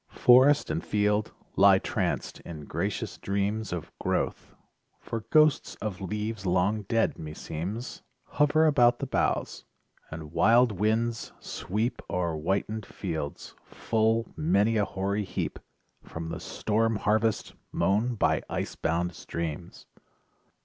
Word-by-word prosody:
Forest 130 - +5
and 80 +1 -2
field 105 0 +1 0.2
lie - - +7
tranced - - -2
in 75 -4 -9
gracious - - -3
dreams 100 +1 -1
Of 90 -2 -5
growth, - - -2 0.4
for 115 -2 -5
ghosts 155 -2 +4
of 105 -3 -5
leaves 105 +2 -3
long 95 +4 +1
dead, 115 -1 +1
me 75 -1 -7
seems, 100 +13 -5 0.2
Hover 150 +2 +3
about 120 -6 +5
the - - -3
boughs; - - -1 0.5
and 80 -1 -8
wild 115 +8 +5
winds 110 +3 -1
sweep 115 +5 -3
O'er 85 -2 -1
whitened 95 +6 -2
fields 80 -6 -5
full 115 0 0
many 115 -8 +2
a 105 -2 +2
hoary 100 +2 -2
heap 95 - -4 0.4
From 80 0 -7
the - - -5
storm 110 +1 0
harvest 110 +1 0 0.2
mown 110 +5 +1
by - - +2
ice - - -3
bound 85 +2 -1
streams! 85 0 -6
105 Hz, 125 wpm, -28 LUFS, 90-115 Hz, 0.5 s, lie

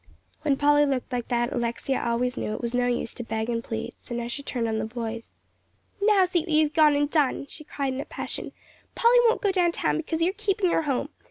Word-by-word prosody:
When 290 -3 +1
Polly 290 +1 +4
looked 265 -1 -2
like 245 -2 -2
that, 240 +1 0
Alexia 240 +2 -1
always 240 +2 0
knew 215 - -3
it - - -6
was 235 0 -2
no 245 0 +2
use 245 -1 -1
to 240 - -6
beg 220 0 -3
and 230 0 -2
plead, 225 -2 -5
so 240 - -7
now 235 0 -3
she 240 +4 -4
turned 245 -4 -2
on 220 -1 -1
the 220 - -2
boys. 230 0 -5 0.7
"Now 405 -2 +5
see 360 -1 +1
what 335 +2 -6
you've 305 -1 +3
gone 300 -1 +5
and 290 0 +2
done," 285 -3 +1
she 305 +2 -10
cried 275 -3 -3
in 265 - -3
a - - -7
passion. - - -5 0.4
"Polly 475 +1 +5
won't 460 - +1
go 400 - +3
down 355 -3 +2
town - - 0
because 320 +1 -2
you're 365 +3 +2
keeping 395 -3 0
her - - +2
home. 280 -2 -1
275 Hz, 240 wpm, -26 LUFS, 240-320 Hz, 0.7 s, Now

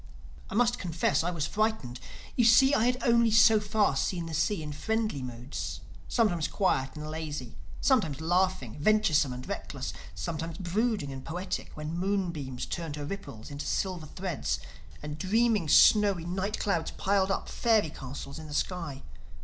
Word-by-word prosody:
I - - -5
must 240 +1 +3
confess 165 -4 +1
I 175 - 0
was 165 -5 -1
frightened. 215 - -1 0.4
You 245 - +3
see 255 +5 +6
I 225 - +3
had 250 0 +2
only 235 -1 +4
so 220 0 +6
far 210 -6 +1
seen 170 +4 -1
the 165 - -6
sea 165 +2 0
in 150 -1 -5
friendly 215 -1 -1
moods: 125 +1 -5 0.3
sometimes 180 -10 +1
quiet 135 -9 0
and 150 0 -6
lazy; 155 -5 -5 0.3
sometimes 185 - +2
laughing, 175 - 0
venturesome 155 -7 +3
and 125 0 -7
reckless; - - -5 0.2
sometimes 160 - -4
brooding 195 - -1
and 130 -1 -7
poetic, 180 +3 -4
when 150 +2 -4
moonbeams 175 -9 -2
turned 165 -4 -4
her 145 -1 -5
ripples 150 - -7
into 145 0 -5
silver 180 -5 -2
threads 180 -1 -3 0.4
and 150 +1 -6
dreaming 215 -3 +2
snowy 200 -1 +6
night 190 +4 -2
clouds 170 -6 0
piled 195 -1 +2
up 195 - -1
fairy 220 -9 +2
castles 140 +1 -7
in 155 - -9
the 145 - -6
sky. 165 -7 -2
175 Hz, 160 wpm, -29 LUFS, 150-210 Hz, 0.4 s, see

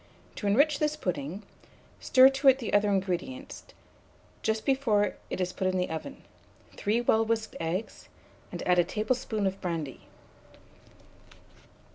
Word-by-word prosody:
To 205 - -3
enrich 285 +8 +3
this 300 0 0
pudding, 180 - -4 0.6
stir 260 0 +6
to 270 0 +5
the 255 -4 -6
other 205 0 +4
ingredients, 200 +9 -3 0.8
just 220 0 -1
before 240 -7 +2 0.2
it - - -4
is 180 -1 -1
put 190 - -1
in 185 0 0
the 180 -2 -1
oven, 160 - -6 0.5
3 220 +4 0
well 225 -2 +3
whisked 225 0 -2
eggs, 170 +6 -4 0.4
and - - -6
add 180 -1 +4
a - - +6
tablespoonful 215 +2 -2
of 190 0 -2
brandy. 165 -7 -4
210 Hz, 135 wpm, -28 LUFS, 185-260 Hz, 0.8 s, stir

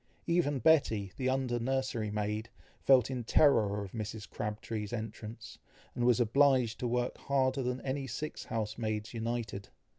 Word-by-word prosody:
Even 170 -4 +2
Betty, 110 -9 +3
the 130 -1 -1
under 130 -2 0
nursery 130 -3 -1
maid, 105 +2 -2 0.3
felt 135 -1 +5
in 125 -2 -3
terror 110 -6 +3
of 95 - -8
Mrs. 110 -1 -5
Crabtree's 105 0 -4
entrance, 110 0 -7 0.3
and 120 -1 -1
was 125 -1 +4
obliged 125 -1 +3
to 125 - -1
work 125 +1 -1
harder 135 -1 +1
than 125 0 -1
any 135 +1 -3
six 150 +5 -5
house 110 0 -3
maids 110 -1 -2
united. 115 -3 -3
120 Hz, 150 wpm, -32 LUFS, 110-130 Hz, 0.3 s, felt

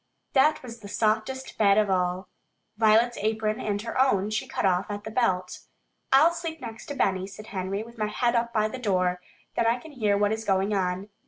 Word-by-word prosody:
That 295 +2 +3
was 235 -2 -9
the 205 - -10
softest 220 +5 -1
bed 200 -2 +5
of 215 -1 +4
all. 180 0 0 0.5
Violet's 225 +2 +3
apron 215 0 0
and 205 -1 -2
her 235 +2 0
own, 210 -6 +2
she 215 - -2
cut - - -2
off 185 +1 +1
at 205 0 -5
the 220 - -7
belt. 185 -6 0 0.5
"I'll 305 +6 +6
sleep 330 -1 -5
next 225 0 -8
to 285 - -5
Benny," 190 -6 0
said 200 +2 -11
Henry, 195 +2 -2
"with 235 0 -14
my 215 - 0
head 235 +2 0
up 235 0 +1
by 215 -2 +2
the 255 +4 -7
door. 180 -5 0 0.3
Then 230 - +2
I 230 +1 +3
can 315 +5 -12
hear 215 -7 +1
what 205 0 +2
is 220 0 -2
going 195 0 +1
on." 190 +1 -1
215 Hz, 215 wpm, -26 LUFS, 195-235 Hz, 0.5 s, I'll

